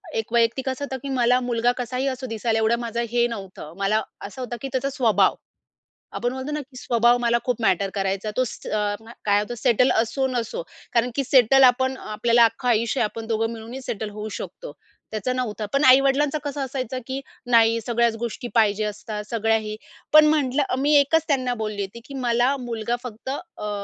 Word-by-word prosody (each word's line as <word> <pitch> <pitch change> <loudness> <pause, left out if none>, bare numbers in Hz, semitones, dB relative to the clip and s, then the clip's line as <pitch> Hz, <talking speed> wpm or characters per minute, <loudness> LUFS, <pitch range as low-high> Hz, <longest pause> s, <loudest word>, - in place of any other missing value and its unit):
एक 225 +1 -3
वैयक्तिक 235 +3 +2
असं 265 +2 -3
होतं 265 -1 -5
की 280 - -4
मला 245 +1 +4
मुलगा 240 0 +1
कसाही 250 +2 -2
असो 260 0 -3
दिसायला 225 0 -1
एवढं 220 +1 +3
माझं 235 0 -3
हे 240 0 +3
नव्हतं. 195 -8 -8
मला 200 +2 +1 0.2
असं 235 +6 -7
होतं 245 -1 -4
की 275 - -3
त्याचा 275 +1 -1
स्वभाव. 245 -6 +2 0.8
आपण 245 +1 -2
म्हणतो 260 +3 -5
ना 300 - -2
की 265 -2 -15
स्वभाव 240 0 +3
मला 235 0 +3
खूप 245 -2 -1
मॅटर 195 -2 +2
करायचा. 195 +1 -2
तो 255 - +4
स - - -9
अ, 210 -1 0 0.3
काय 205 -1 +4
होतं 225 +3 -5
सेटल 250 +2 +3
असो 235 +4 +1
नसो. 255 - -3 0.3
कारण 240 +1 +2
की 275 - +1
सेटल 265 0 +5
आपण 260 +1 +4
अ, - - -13
आपल्याला 235 +2 +4
अख्खं 230 +2 -2
आयुष्य 230 +3 +1
आहे - - +3
आपण 225 +1 -6
दोघं 225 0 0
मिळूनही 230 +4 -8
सेटल 220 -4 -4
होऊ 210 +1 -6
शकतो. - - -8 0.4
त्याचं 220 +4 -2
नव्हतं. 220 -4 -3
पण 275 +2 +2
आई-वडिलांचं 275 +3 +5
कसं 285 -1 -4
असायचं 260 -2 -3
की 265 0 -3 0.3
नाही 230 -1 +5
सगळ्याच 235 0 +1
गोष्टी 235 +1 -4
पाहिजे 215 -2 +3
असतात 210 0 -5
सगळ्या 225 -1 +2
हे. 215 -1 -5 0.4
पण 305 0 +9
म्हटलं 290 -2 +2
अ - - +1
मी 290 +2 +2
एकच 305 +3 +3
त्यांना 255 -4 +1
बोलली 215 -1 -3
होती 200 +4 -6
की 280 - -11
मला 245 0 +1
मुलगा 235 -1 -2
फक्त 245 +1 -8
अ, 280 -7 -6
240 Hz, 200 wpm, -23 LUFS, 220-260 Hz, 0.8 s, पण